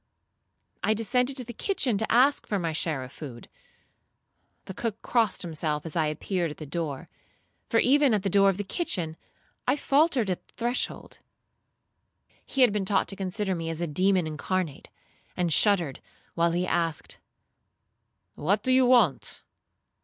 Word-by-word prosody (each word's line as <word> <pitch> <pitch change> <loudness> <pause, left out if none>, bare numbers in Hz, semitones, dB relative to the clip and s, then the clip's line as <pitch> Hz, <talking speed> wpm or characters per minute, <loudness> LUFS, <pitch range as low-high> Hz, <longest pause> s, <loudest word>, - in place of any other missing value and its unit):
I 215 - +2
descended 250 +4 0
to 255 - -2
the 240 - -8
kitchen 290 - 0
to 220 - -1
ask 265 +5 +4
for 205 - 0
my 165 -3 -2
share 155 -4 -1
of 130 - -10
food. 125 -7 -10 1.2
The 190 - -7
cook 220 +1 -4
crossed 230 -5 +1
himself 155 -2 -2
as 160 - -6
I 160 -2 +2
appeared 170 +3 -2
at 150 - -9
the 155 - -7
door; 145 -2 -4 0.6
for 230 - +3
even 280 +2 +4
at 200 - -2
the - - 0
door 195 0 +5
of 190 - -1
the 205 - -2
kitchen 185 - -1 0.5
I 255 - +3
faultered 280 - +2
at 180 - -5
the - - -20
threshold. 240 +2 -2 1.2
He 275 - -2
had 245 -5 +6
been 210 -2 0
taught 190 +1 +1
to 195 - -3
consider 190 +1 -2
me 165 -2 -4
as 165 -1 -4
a 175 - 0
demon 185 +3 +2
incarnate, 155 +1 -3 0.5
and 175 -3 +2
shuddered, 175 -8 +3 0.3
while 170 0 +2
he 175 +2 0
asked, 165 -3 -2 1.1
'What 200 +7 0
do 260 - +1
you 255 -1 +5
want?' 230 - +2
190 Hz, 165 wpm, -27 LUFS, 165-235 Hz, 1.2 s, had